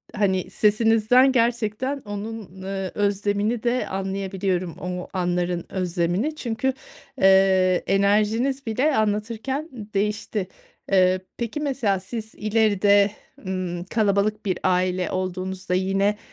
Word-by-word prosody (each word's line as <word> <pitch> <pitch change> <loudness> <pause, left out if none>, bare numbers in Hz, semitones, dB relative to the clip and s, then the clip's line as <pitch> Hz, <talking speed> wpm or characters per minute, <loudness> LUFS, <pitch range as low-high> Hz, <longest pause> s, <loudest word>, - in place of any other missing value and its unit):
hani, 190 -3 +1
sesinizden 225 +4 +4
gerçekten 240 +2 0
onun, 205 -2 -7
eee, 195 -1 -4
özlemini 205 +3 0
de 245 +1 0
anlayabiliyorum 190 -2 -2
o 180 0 -4
anların 175 -1 -1
özlemini. 185 - -1
Çünkü, 255 -1 -1 0.5
eee, 190 -1 +5
enerjiniz 215 +7 +2
bile 260 +7 +1
anlatırken 225 +8 -1 0.2
değişti. 210 -1 -1 0.4
Eee, 185 -1 +4 0.2
peki, 235 +5 -3
mesela, 250 -10 0
siz 220 +3 -7
ileride, 205 -2 +3 0.4
ımm, 180 -2 -3
kalabalık 210 +1 0
bir 185 -3 -1
aile 185 0 +1
olduğunuzda 185 0 -3
yine 195 +3 +1
200 Hz, 105 wpm, -24 LUFS, 185-225 Hz, 0.5 s, eee